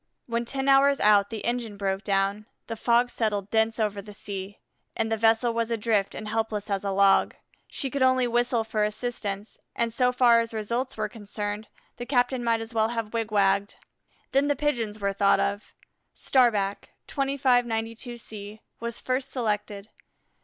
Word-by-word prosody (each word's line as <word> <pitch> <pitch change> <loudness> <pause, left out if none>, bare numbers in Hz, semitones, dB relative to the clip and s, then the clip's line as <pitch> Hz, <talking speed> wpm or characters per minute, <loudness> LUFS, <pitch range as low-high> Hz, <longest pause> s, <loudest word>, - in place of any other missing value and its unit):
When 235 0 -2
ten 270 +2 -3
hours 275 0 +5
out 205 -1 +5
the 225 -2 -5
engine 235 -3 -2
broke 195 0 -2
down, 200 +1 0 0.2
the 230 - -5
fog 240 +2 +2
settled 210 -3 -2
dense 220 0 +1
over 210 -2 -1
the 205 +1 -12
sea, 200 0 -6 0.4
and 225 0 -1
the - - +3
vessel 225 +2 +3
was 230 0 -1
adrift 220 -3 0
and 215 - -6
helpless 215 -1 -2
as 195 0 -1
a 200 - -1
log. 195 0 +3 0.3
She 270 -3 -4
could 280 - -2
only 255 -1 +4
whistle 240 -1 +1
for 220 -1 -1
assistance, 210 -2 -4 0.2
and 230 -1 -1
so 250 +1 +2
far 245 -2 +5
as 230 -1 -3
results 235 +4 -2
were - - -1
concerned, 210 -1 -5 0.3
the 240 - -6
captain 250 -1 +1
might 230 -1 +1
as 225 +1 -7
well 220 -1 +2
have 230 -2 -4
wigwagged. 200 -3 +1 0.6
Then 275 +2 +3
the 290 - +2
Pigeons 235 -7 -1
were 200 -1 -1
thought 200 0 +3
of. 200 +1 -2 0.4
Starback, 215 -7 +1 0.2
2592 245 -4 0
C, 210 -1 -8 0.2
was 235 0 -4
first 255 +1 -2
selected. 210 -3 -3
225 Hz, 165 wpm, -26 LUFS, 205-240 Hz, 0.6 s, hours